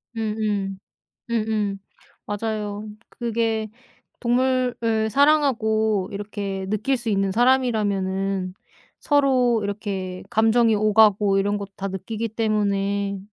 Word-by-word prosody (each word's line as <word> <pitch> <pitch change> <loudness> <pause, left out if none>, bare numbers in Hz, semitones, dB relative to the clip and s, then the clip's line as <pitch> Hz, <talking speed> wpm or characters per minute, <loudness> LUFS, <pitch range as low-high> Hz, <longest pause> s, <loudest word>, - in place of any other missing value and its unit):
음음. 210 -3 -2 0.5
음음. 215 -3 -1 0.5
맞아요. 210 0 -3 0.2
그게 225 -2 -1 0.5
동물을 240 -3 +1
사랑하고 220 -8 +2
이렇게 200 -2 -4
느낄 215 +6 0
수 240 -1 -5
있는 195 -2 +1
사람이라면은 195 -6 +1 0.5
서로 260 -5 +3
이렇게 195 -3 -4
감정이 225 +1 +3
오가고 210 -1 +4
이런 205 +1 +1
것 200 -1 -6
다 195 0 -3
느끼기 220 +4 -4
때문에 200 -2 0
215 Hz, 230 characters per minute, -23 LUFS, 200-230 Hz, 0.5 s, 오가고